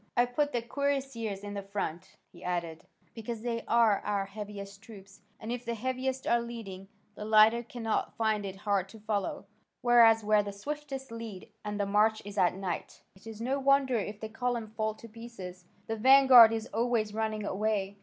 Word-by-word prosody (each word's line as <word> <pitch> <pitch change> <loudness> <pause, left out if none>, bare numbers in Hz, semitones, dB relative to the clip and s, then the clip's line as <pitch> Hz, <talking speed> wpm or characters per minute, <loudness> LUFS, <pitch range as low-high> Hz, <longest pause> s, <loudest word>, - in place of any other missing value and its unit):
I 240 - +5
put 290 +4 -1
the 240 -3 -2
cuirassiers 260 -6 -2
in 205 0 -6
the 200 - -4
front," 195 -4 -5 0.2
he 175 0 -14
added, 170 -2 -4 0.3
"because 225 0 -6
they 230 -1 -2
are 230 -3 +4
our 200 -1 -2
heaviest 200 -1 -8
troops, 200 -2 -14 0.2
and 220 - -6
if 245 0 -4
the 235 -1 -3
heaviest 260 +2 -3
are 235 - +3
leading, 215 -5 -8 0.3
the 210 - -8
lighter 215 +2 +5
cannot 230 -2 -3
find 220 -2 +1
it 195 -1 -5
hard 195 -1 -1
to 220 - -13
follow: 205 -2 -3 0.4
whereas 230 -2 +6
where 210 0 +4
the 205 -1 -6
swiftest 275 +3 -6
lead 225 -5 -8
and 210 0 -4
the 200 - +1
march 210 +2 +2
is 205 0 -5
at 180 0 +3
night, 190 -2 -5
it 190 +4 -16
is 220 -1 -8
no 260 +4 -1
wonder 275 -1 +3
if 205 +1 -5
the 220 - -5
column 230 -1 -3
fall 220 -1 -1
to 230 - -12
pieces: 210 -6 -10 0.2
the 225 - -3
vanguard 260 -1 +8
is 225 -1 -2
always 225 -2 0
running 215 -1 -2
away. 200 -1 -1
220 Hz, 185 wpm, -30 LUFS, 200-235 Hz, 0.4 s, vanguard